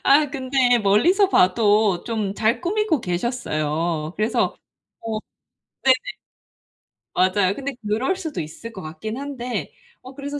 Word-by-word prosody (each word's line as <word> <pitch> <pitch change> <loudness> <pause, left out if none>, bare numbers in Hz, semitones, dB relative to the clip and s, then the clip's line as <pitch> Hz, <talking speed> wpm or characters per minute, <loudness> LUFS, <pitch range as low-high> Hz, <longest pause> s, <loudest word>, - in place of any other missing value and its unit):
아 290 +1 +4
근데 260 -2 +2
멀리서 280 - +4
봐도 205 - +3
좀 215 -4 -2
잘 220 +3 +1
꾸미고 375 - 0
계셨어요. 165 - -2
그래서 215 +2 0 0.4
어 225 -1 -3 0.7
네네. 265 -1 +6 1.2
맞아요. 185 +1 +3
근데 280 0 -4
그럴 235 - +1
수도 320 - -4
있을 160 +9 -8
것 195 -4 -9
같긴 165 +9 -6
한데 265 -3 -4 0.3
어 255 - -11
그래서 285 +1 -5
230 Hz, 250 characters per minute, -22 LUFS, 190-275 Hz, 1.2 s, 네네